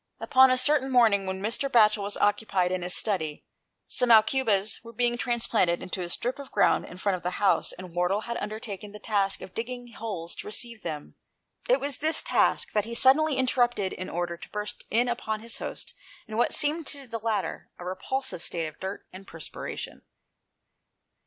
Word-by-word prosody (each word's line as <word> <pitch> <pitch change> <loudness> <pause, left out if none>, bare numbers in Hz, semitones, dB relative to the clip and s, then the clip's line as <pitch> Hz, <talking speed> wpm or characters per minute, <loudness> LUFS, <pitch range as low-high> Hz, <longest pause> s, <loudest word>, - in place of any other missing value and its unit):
Upon 260 0 +5
a 255 - +3
certain 270 +1 +3
morning, 220 -6 +4
when 190 +1 -4
Mr. 230 +6 -1
Batchel 215 -3 +5
was 200 +1 -2
occupied 205 -3 +1
in 185 -1 -1
his 180 +1 +1
study, 160 -8 -1 0.4
some 250 - 0
aucubas 220 -2 +3
were 230 0 -11
being 240 +1 +1
transplanted 230 -8 +1
into 185 0 -4
a 175 - -4
strip 245 +9 0
of 280 - -9
ground - - +3
in 180 - -11
front 190 0 0
of - - -13
the 180 +2 -3
house, 200 -2 +2
and 180 -2 -10
Wardle 180 +4 +1
had 235 +1 -5
undertaken 210 -1 -6
the 210 - -9
task 200 -2 0
of 185 - -10
digging 245 +1 -5
holes 205 -7 -5
to - - -7
receive 230 +1 -2
them. 150 -3 -7 0.5
It - - +5
was 280 -2 -2
this 315 +2 +3
task - - +2
that 210 -1 0
he 235 +1 -6
suddenly 280 +4 +5
interrupted 240 -6 +1
in 185 - -6
order 175 0 -3
to - - -11
burst 210 0 -5
in 240 +3 +2
upon 220 -3 -3
his 230 0 -5
host - - -6 0.3
in 215 - -7
what 240 - +2
seemed 305 +1 +2
to 280 -1 +1
the 230 -2 -5
latter 220 -1 -3
a 175 - -9
repulsive 190 +3 -3
state 170 -1 -2
of 155 - -8
dirt 190 +1 -6
and 190 +1 -11
perspiration. 165 -1 -7
215 Hz, 190 wpm, -27 LUFS, 190-245 Hz, 0.5 s, Upon